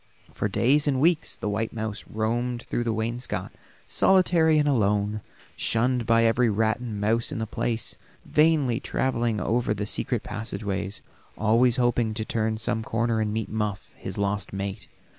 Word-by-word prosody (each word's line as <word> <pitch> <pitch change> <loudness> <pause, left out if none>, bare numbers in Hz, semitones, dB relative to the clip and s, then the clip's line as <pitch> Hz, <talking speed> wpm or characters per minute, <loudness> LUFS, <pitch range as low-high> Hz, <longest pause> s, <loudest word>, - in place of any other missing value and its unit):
For - - -1
days 135 +9 +3
and 135 -3 +2
weeks 165 +2 +2
the - - -5
white 110 +2 -2
mouse 110 -2 -4
roamed 120 +3 -1
through 120 - -2
the 115 - +1
wainscot 115 +3 -3 0.3
solitary 170 -4 +4
and 150 -1 +2
alone, 105 -4 +1 0.3
shunned 120 +1 +1
by 115 0 +4
every 115 +1 +3
rat 110 +2 +1
and 115 -4 -5
mouse 115 +6 +1
in 145 - -4
the 110 - -2
place, 115 +1 -2 0.3
vainly 150 -6 +3
traveling 120 -6 -1
over 115 +2 0
the 105 0 -3
secret - - -2
passageways, 100 -2 -4 0.3
always 115 +3 +3
hoping 120 -3 +1
to 110 0 -3
turn 110 -1 -1
some 110 0 0
corner 115 0 0
and 105 -1 -1
meet 110 0 -3
Muff, 105 -2 -3
his - - -6
lost 100 -1 -1
mate. 100 +1 -5
115 Hz, 160 wpm, -26 LUFS, 105-125 Hz, 0.3 s, solitary